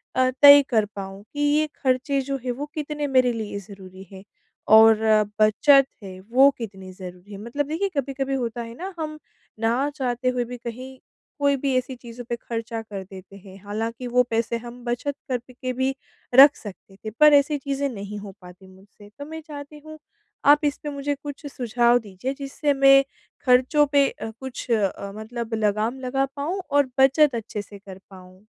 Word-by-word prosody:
अ, 255 Hz, 0 st, +3 dB
तय 285 Hz, 0 st, +10 dB
कर 220 Hz, -4 st, +2 dB
पाऊँ 195 Hz, 0 st, -7 dB
कि 290 Hz, -, -6 dB
ये 295 Hz, +1 st, +2 dB, 0.2 s
खर्चे 265 Hz, +1 st, +1 dB
जो 275 Hz, +1 st, -3 dB
हैं 250 Hz, -, 0 dB
वो 270 Hz, +4 st, -5 dB
कितने 300 Hz, -1 st, -3 dB
मेरे 255 Hz, -2 st, +3 dB
लिए 215 Hz, -3 st, -5 dB
ज़रूरी 190 Hz, -1 st, -12 dB
हैं? 190 Hz, -1 st, -11 dB, 0.4 s
और 220 Hz, +1 st, +7 dB, 0.4 s
बचत 275 Hz, +6 st, +5 dB, 0.2 s
है 185 Hz, -1 st, -9 dB
वो 270 Hz, +3 st, +7 dB
कितनी 195 Hz, -5 st, -8 dB
ज़रूरी 180 Hz, +1 st, -11 dB
है? 200 Hz, -, -7 dB
मतलब 240 Hz, +7 st, -4 dB
देखिए 335 Hz, +6 st, -1 dB
कभी-कभी 270 Hz, 0 st, -2 dB
होता 240 Hz, -2 st, -3 dB
है 230 Hz, 0 st, -8 dB
ना 380 Hz, +4 st, -6 dB
हम 310 Hz, -1 st, -4 dB, 0.4 s
ना 235 Hz, +5 st, +1 dB
चाहते 255 Hz, -3 st, -1 dB
हुए 250 Hz, -1 st, -1 dB
भी 245 Hz, +1 st, -8 dB
कहीं 250 Hz, +3 st, -8 dB, 0.4 s
कोई 285 Hz, -1 st, +3 dB
भी 270 Hz, 0 st, -1 dB
ऐसी 255 Hz, +1 st, -3 dB
चीज़ों 240 Hz, 0 st, -10 dB
पे 240 Hz, -, -1 dB
खर्चा 230 Hz, 0 st, -5 dB
कर 205 Hz, -3 st, -8 dB
देते 190 Hz, +1 st, -13 dB
हैं, 190 Hz, 0 st, -14 dB
हालाँकि 225 Hz, +4 st, -4 dB
वो 250 Hz, +1 st, +3 dB
पैसे 230 Hz, +1 st, -1 dB
हम 240 Hz, +1 st, -11 dB
बचत 245 Hz, +4 st, -2 dB
करके 255 Hz, +1 st, -4 dB
भी 260 Hz, +1 st, -1 dB, 0.4 s
रख 280 Hz, +3 st, +9 dB
सकते 195 Hz, -1 st, -12 dB
थे -, -, -2 dB
पर 300 Hz, 0 st, +7 dB
ऐसी 290 Hz, +1 st, +4 dB
चीज़ें 280 Hz, 0 st, -2 dB
नहीं 205 Hz, -3 st, -7 dB
हो 200 Hz, -1 st, -9 dB
पाती 180 Hz, +1 st, -14 dB
मुझसे 205 Hz, +2 st, -18 dB
तो 285 Hz, -, -6 dB
मैं 320 Hz, +2 st, -8 dB
चाहती 290 Hz, 0 st, -9 dB
हूँ 310 Hz, 0 st, -11 dB, 0.5 s
आप 295 Hz, +2 st, +6 dB
इस 290 Hz, 0 st, 0 dB
पे 295 Hz, -, -3 dB
मुझे 285 Hz, 0 st, -3 dB
कुछ 285 Hz, +1 st, -9 dB
सुझाव 240 Hz, -2 st, +2 dB
दीजिए 215 Hz, +4 st, -6 dB
जिससे 285 Hz, +1 st, -1 dB
मैं 275 Hz, 0 st, +6 dB, 0.4 s
खर्चों 260 Hz, +4 st, +4 dB
पे 280 Hz, -1 st, +3 dB
अ, 220 Hz, -, -8 dB
कुछ 265 Hz, -1 st, -7 dB
अ, 200 Hz, -2 st, -1 dB
मतलब 230 Hz, +1 st, -6 dB
लगाम 215 Hz, +4 st, -1 dB
लगा 265 Hz, +1 st, -1 dB
पाऊँ 325 Hz, +7 st, -3 dB
और 285 Hz, -1 st, +2 dB
बचत 270 Hz, +1 st, +4 dB
अच्छे 215 Hz, -2 st, -5 dB
से 205 Hz, 0 st, -13 dB
कर 195 Hz, -1 st, -12 dB
पाऊँ। 185 Hz, +1 st, -16 dB
250 Hz, 185 wpm, -23 LUFS, 215-280 Hz, 0.5 s, तय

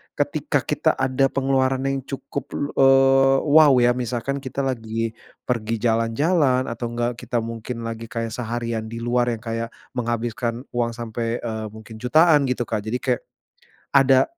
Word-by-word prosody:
ketika -, -, 0 dB
kita -, -, +1 dB
ada 135 Hz, +1 st, +1 dB
pengeluaran 135 Hz, -1 st, +1 dB
yang 135 Hz, 0 st, 0 dB
cukup 135 Hz, 0 st, -5 dB
lu 145 Hz, -, -2 dB
eee, 135 Hz, 0 st, +5 dB
wow, 150 Hz, -1 st, +6 dB
ya, 120 Hz, +1 st, +3 dB
misalkan 125 Hz, +3 st, -2 dB
kita 135 Hz, 0 st, -4 dB
lagi 115 Hz, -3 st, -3 dB, 0.3 s
pergi 115 Hz, -2 st, -1 dB
jalan-jalan 130 Hz, +4 st, +2 dB
atau 120 Hz, 0 st, -4 dB
nggak 120 Hz, 0 st, -1 dB
kita 120 Hz, -1 st, -2 dB
mungkin 115 Hz, +1 st, -6 dB
lagi 115 Hz, 0 st, -5 dB
kayak 115 Hz, 0 st, -4 dB
seharian 115 Hz, -1 st, -3 dB
di 115 Hz, +1 st, -7 dB
luar 120 Hz, 0 st, +1 dB
yang 110 Hz, -, -7 dB
kayak 115 Hz, 0 st, -4 dB, 0.2 s
menghabiskan 120 Hz, 0 st, -2 dB
uang 120 Hz, -1 st, -1 dB
sampai, 115 Hz, 0 st, -3 dB
eee, 110 Hz, -2 st, -4 dB
mungkin 110 Hz, 0 st, -11 dB
jutaan, 150 Hz, +5 st, +4 dB
gitu 125 Hz, -2 st, -2 dB
Kak. 105 Hz, -2 st, -2 dB
Jadi 110 Hz, +3 st, -1 dB
kayak -, -, -1 dB, 0.7 s
ada 135 Hz, -1 st, +5 dB
120 Hz, 155 wpm, -23 LUFS, 115-135 Hz, 0.7 s, wow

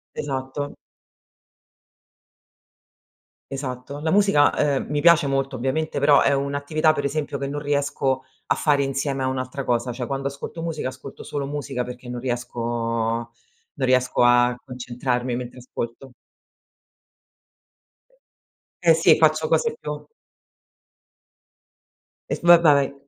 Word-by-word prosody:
Esatto. 140 Hz, 0 st, -4 dB, 2.8 s
Esatto. 135 Hz, +1 st, -5 dB
La 160 Hz, +1 st, 0 dB
musica, 200 Hz, -8 st, +4 dB, 0.2 s
ehm, -, -, -2 dB
mi 145 Hz, 0 st, 0 dB
piace 170 Hz, -3 st, +5 dB
molto 135 Hz, -1 st, -1 dB
ovviamente, 145 Hz, +5 st, -1 dB
però 140 Hz, 0 st, +5 dB
è -, -, +3 dB
un'attività, 145 Hz, +3 st, +1 dB
per 145 Hz, -2 st, -3 dB
esempio, 145 Hz, 0 st, -2 dB
che 140 Hz, 0 st, -3 dB
non 145 Hz, +1 st, -4 dB
riesco 140 Hz, -2 st, 0 dB, 0.2 s
a -, -, +2 dB
fare 145 Hz, -2 st, +2 dB
insieme 135 Hz, 0 st, -2 dB
a -, -, +1 dB
un'altra 130 Hz, +1 st, -3 dB
cosa, 120 Hz, +1 st, 0 dB
cioè 120 Hz, 0 st, -4 dB
quando 135 Hz, 0 st, -2 dB
ascolto 140 Hz, +4 st, -7 dB
musica, 160 Hz, -5 st, -3 dB
ascolto 130 Hz, +1 st, -8 dB
solo 140 Hz, -1 st, -4 dB
musica 140 Hz, -3 st, -3 dB
perché 125 Hz, 0 st, -9 dB
non 120 Hz, 0 st, -5 dB
riesco 120 Hz, -1 st, -4 dB, 1.1 s
non 135 Hz, -2 st, -1 dB
riesco 125 Hz, -1 st, +2 dB
a 120 Hz, 0 st, +4 dB
concentrarmi 125 Hz, -1 st, -3 dB
mentre 125 Hz, +1 st, -6 dB
ascolto. 125 Hz, +1 st, -7 dB, 2.7 s
Eh 165 Hz, -2 st, +6 dB
sì, 160 Hz, -, +5 dB
faccio 155 Hz, 0 st, +3 dB
cose 460 Hz, -, +1 dB
più -, -, -6 dB, 2.2 s
Eh -, -, 0 dB
f 170 Hz, -, -6 dB
va 175 Hz, 0 st, +10 dB
vai. 140 Hz, -3 st, +4 dB
135 Hz, 125 wpm, -23 LUFS, 125-145 Hz, 2.8 s, va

